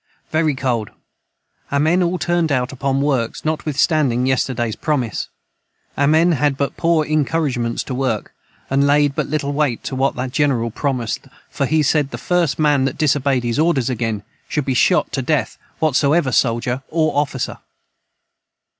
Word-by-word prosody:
Very 155 Hz, -2 st, +1 dB
cold 120 Hz, -5 st, -1 dB, 0.8 s
our 140 Hz, -, +1 dB
men 160 Hz, +5 st, +3 dB
all 180 Hz, +1 st, +1 dB
turned 175 Hz, -1 st, 0 dB
out 125 Hz, -2 st, 0 dB
upon 135 Hz, 0 st, -1 dB
works 135 Hz, -5 st, 0 dB
notwith 155 Hz, -1 st, -2 dB
Standing 140 Hz, -5 st, +2 dB
yesterdays 125 Hz, -3 st, 0 dB
promise 130 Hz, -, -2 dB, 0.7 s
our 140 Hz, -, +2 dB
men 160 Hz, +4 st, +4 dB
had 145 Hz, -3 st, +1 dB
but 140 Hz, 0 st, -2 dB
poor 165 Hz, -2 st, +2 dB
incouragements 145 Hz, -6 st, 0 dB
to 130 Hz, -, -5 dB
work 125 Hz, -5 st, -2 dB, 0.2 s
& -, -, -32 dB
laid 140 Hz, +1 st, +3 dB
but -, -, -2 dB
Little 145 Hz, -1 st, -2 dB
weight 140 Hz, -5 st, 0 dB
to 130 Hz, -, -4 dB
what 135 Hz, +1 st, +1 dB
the 125 Hz, +1 st, -3 dB
jineral 130 Hz, -4 st, 0 dB
promised 125 Hz, -3 st, -2 dB
them -, -, -22 dB, 0.2 s
for 140 Hz, -, -1 dB
he 155 Hz, +1 st, +2 dB
said 145 Hz, 0 st, +2 dB
the -, -, -6 dB
first 175 Hz, -5 st, 0 dB
man 145 Hz, -3 st, +3 dB
that 135 Hz, -, -2 dB
disobeyed 140 Hz, -4 st, +1 dB
his 120 Hz, +3 st, -1 dB
orders 140 Hz, -6 st, +2 dB
again 115 Hz, -4 st, -2 dB, 0.3 s
should 150 Hz, -3 st, -1 dB
be 135 Hz, -, 0 dB
shot 125 Hz, -, +2 dB
to -, -, -1 dB
death -, -, -1 dB, 0.2 s
whatsoever 150 Hz, -1 st, +2 dB
soldier 120 Hz, +2 st, +1 dB
or 160 Hz, -1 st, +1 dB
officer. 140 Hz, -3 st, -1 dB
140 Hz, 165 wpm, -19 LUFS, 125-155 Hz, 0.8 s, men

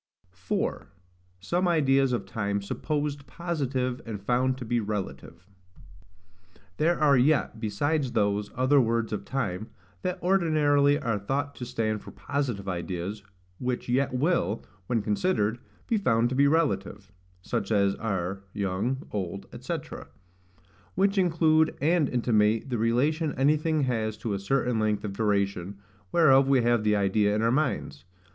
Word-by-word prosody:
4. 95 Hz, -1 st, -3 dB, 0.5 s
Some 175 Hz, -, 0 dB
ideas 135 Hz, -5 st, +3 dB
of 120 Hz, -5 st, -1 dB
Time 100 Hz, 0 st, -2 dB
supposed 145 Hz, +7 st, -3 dB
positive 135 Hz, -7 st, -2 dB
and 110 Hz, -3 st, -6 dB
found 125 Hz, +5 st, +1 dB
to 125 Hz, -, -7 dB
be 120 Hz, +1 st, 0 dB
relative. 100 Hz, -4 st, -5 dB, 1.3 s
There 170 Hz, +3 st, +2 dB
are 145 Hz, -3 st, +5 dB
yet, 130 Hz, -3 st, +2 dB
besides 130 Hz, +6 st, -1 dB
those, 100 Hz, -1 st, +1 dB
other 130 Hz, +3 st, +4 dB
words 115 Hz, -1 st, 0 dB
of 105 Hz, -, -4 dB
time, 110 Hz, -6 st, -3 dB, 0.3 s
that 180 Hz, 0 st, -2 dB
ordinarily 150 Hz, -6 st, +3 dB
are 115 Hz, -8 st, -1 dB
thought 140 Hz, +7 st, -2 dB
to 125 Hz, -, -6 dB
stand 110 Hz, -4 st, -1 dB
for -, -, -11 dB
positive 125 Hz, -9 st, -3 dB
ideas, 90 Hz, +3 st, -4 dB, 0.4 s
which 125 Hz, -1 st, -3 dB
yet 130 Hz, +2 st, +1 dB
will, 130 Hz, -, 0 dB, 0.2 s
when 115 Hz, -4 st, 0 dB
considered, 110 Hz, -, 0 dB, 0.3 s
be 230 Hz, -, +1 dB
found 120 Hz, -, +2 dB
to 130 Hz, -, -3 dB
be 140 Hz, +1 st, +4 dB
relative; 105 Hz, -, 0 dB, 0.3 s
such 115 Hz, -1 st, -3 dB
as 100 Hz, -2 st, +3 dB
are, 95 Hz, -3 st, -3 dB
young, 105 Hz, +7 st, -2 dB
old, 95 Hz, -1 st, -4 dB, 0.2 s
&c., -, -, -2 dB, 1.2 s
which 195 Hz, +2 st, +2 dB
include 160 Hz, -3 st, +3 dB
and 160 Hz, -1 st, +2 dB
intimate 115 Hz, 0 st, +1 dB
the 120 Hz, -, 0 dB
relation 145 Hz, +8 st, +1 dB
anything 155 Hz, +3 st, +2 dB
has 110 Hz, -4 st, -1 dB
to 110 Hz, -1 st, -3 dB
a 100 Hz, -, -2 dB
certain 120 Hz, +2 st, 0 dB
length 105 Hz, -1 st, 0 dB
of 100 Hz, -2 st, -4 dB
duration, 100 Hz, -2 st, -1 dB, 0.3 s
whereof 135 Hz, -5 st, +5 dB
we 135 Hz, -3 st, +3 dB
have 120 Hz, -2 st, +2 dB
the 105 Hz, 0 st, +3 dB
idea 105 Hz, +1 st, +2 dB
in 110 Hz, -, 0 dB
our 115 Hz, -, +3 dB
minds. 75 Hz, -, -1 dB
120 Hz, 145 wpm, -27 LUFS, 105-145 Hz, 1.3 s, are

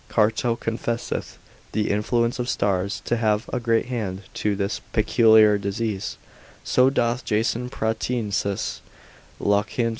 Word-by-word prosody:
Carto 115 Hz, +2 st, +1 dB
confesseth 115 Hz, +1 st, -3 dB, 0.4 s
the 105 Hz, 0 st, 0 dB
influence 115 Hz, +4 st, 0 dB
of 125 Hz, +1 st, -2 dB
stars 100 Hz, 0 st, 0 dB
to 120 Hz, -, 0 dB
have 110 Hz, -1 st, +1 dB
a 125 Hz, -, +1 dB
great 115 Hz, -1 st, +1 dB
hand 105 Hz, -6 st, -4 dB
to 105 Hz, -1 st, 0 dB
this 100 Hz, +1 st, -2 dB
peculiar 110 Hz, -2 st, +5 dB
disease, 100 Hz, 0 st, -3 dB, 0.5 s
so 130 Hz, +1 st, +4 dB
doth 120 Hz, -2 st, 0 dB
Jason 115 Hz, +3 st, 0 dB
Pratensis, 110 Hz, -3 st, -2 dB, 0.6 s
Lonicerius 100 Hz, 0 st, +2 dB
praefat. 115 Hz, +1 st, 0 dB
110 Hz, 125 wpm, -24 LUFS, 105-120 Hz, 0.6 s, peculiar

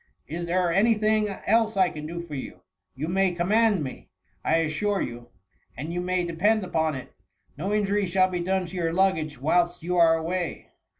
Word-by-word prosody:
Is 170 Hz, +1 st, -5 dB
there 175 Hz, 0 st, +1 dB
any 220 Hz, +5 st, +4 dB
thing 215 Hz, 0 st, +2 dB
else 220 Hz, +2 st, +1 dB
I 185 Hz, -2 st, +4 dB
can 150 Hz, 0 st, -7 dB
do 170 Hz, +1 st, -5 dB
for 165 Hz, -3 st, -10 dB
you? 135 Hz, -, -7 dB, 0.3 s
You 145 Hz, +4 st, -4 dB
may 190 Hz, +1 st, +2 dB
command 200 Hz, +1 st, +2 dB
me, 130 Hz, -, -8 dB, 0.3 s
I -, -, +2 dB
assure 165 Hz, +6 st, 0 dB
you; 120 Hz, 0 st, -5 dB, 0.5 s
and 155 Hz, +6 st, -5 dB
you 175 Hz, -, -1 dB
may 180 Hz, 0 st, 0 dB
depend 195 Hz, +6 st, +1 dB
upon 160 Hz, -4 st, 0 dB
it, 130 Hz, -, -9 dB, 0.4 s
no 185 Hz, +8 st, -3 dB
injury 205 Hz, -1 st, +1 dB
shall 185 Hz, +1 st, +3 dB
be 180 Hz, -1 st, -3 dB
done 185 Hz, +1 st, 0 dB
to 175 Hz, -, -9 dB
your 165 Hz, -2 st, -1 dB
luggage, 160 Hz, -6 st, +1 dB
whilst 175 Hz, +4 st, +1 dB
you 180 Hz, +1 st, -1 dB
are 165 Hz, -1 st, +6 dB
away." 175 Hz, +1 st, -3 dB
175 Hz, 190 wpm, -26 LUFS, 165-195 Hz, 0.5 s, are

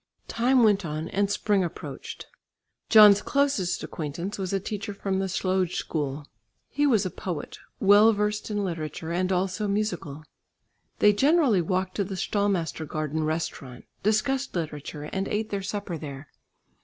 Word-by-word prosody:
Time 250 Hz, +1 st, +3 dB
went 205 Hz, -2 st, +4 dB
on 155 Hz, 0 st, -4 dB
and 200 Hz, +1 st, 0 dB
spring 205 Hz, -1 st, +1 dB
approached. 170 Hz, -, -7 dB, 0.6 s
John's 210 Hz, -2 st, +8 dB
closest 275 Hz, -11 st, 0 dB
acquaintance 170 Hz, +7 st, -5 dB
was 185 Hz, -2 st, -3 dB
a 195 Hz, -, +1 dB
teacher 205 Hz, +1 st, -5 dB
from 195 Hz, -1 st, -2 dB
the 195 Hz, -, -1 dB
Slöjd 185 Hz, -1 st, 0 dB
School. 145 Hz, -2 st, -3 dB, 0.4 s
He 290 Hz, +1 st, +1 dB
was 220 Hz, -7 st, +3 dB
a 185 Hz, -, -2 dB
poet, 170 Hz, -4 st, -6 dB, 0.2 s
well 205 Hz, +3 st, +6 dB
versed 210 Hz, 0 st, -1 dB
in 205 Hz, -1 st, -1 dB
literature, 160 Hz, -2 st, -4 dB
and 185 Hz, +2 st, 0 dB
also 190 Hz, +3 st, 0 dB
musical. 180 Hz, -8 st, -2 dB, 0.7 s
They 210 Hz, -, +5 dB
generally 270 Hz, -, +3 dB
walked 185 Hz, +2 st, -1 dB
to 200 Hz, -, +2 dB
the 195 Hz, 0 st, -5 dB
Stallmastergarden 160 Hz, -6 st, -1 dB
restaurant, 155 Hz, -5 st, -4 dB, 0.2 s
discussed 250 Hz, +6 st, 0 dB
literature, 150 Hz, -2 st, -4 dB
and 190 Hz, +6 st, -3 dB
ate 215 Hz, +1 st, -2 dB
their 200 Hz, -1 st, -2 dB
supper 195 Hz, -4 st, -4 dB
there. 140 Hz, -2 st, -8 dB
190 Hz, 145 wpm, -26 LUFS, 165-210 Hz, 0.7 s, John's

